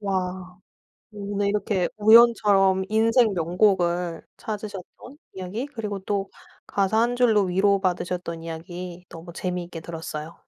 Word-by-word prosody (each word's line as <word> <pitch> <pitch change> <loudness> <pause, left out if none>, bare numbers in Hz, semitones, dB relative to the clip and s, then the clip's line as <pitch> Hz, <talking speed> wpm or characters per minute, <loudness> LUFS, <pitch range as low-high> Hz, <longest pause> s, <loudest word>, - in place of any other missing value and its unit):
와. 185 -2 -3 0.5
근데 205 -1 -3
이렇게 200 -3 0
우연처럼 210 -4 +5
인생 225 +1 +3
명곡을 175 -1 +1
찾으셨던 210 +5 -8 0.2
이야기 190 +7 -5
그리고 220 -8 -5
또 195 0 -3 0.4
가사 200 +2 0
1 240 +1 +1
줄로 225 -4 +4
위로받으셨던 180 -3 0
이야기 175 +2 -7
너무 170 +1 -11
재미있게 175 -1 -4
들었어요. 160 -1 -7
190 Hz, 280 characters per minute, -24 LUFS, 175-210 Hz, 0.5 s, 우연처럼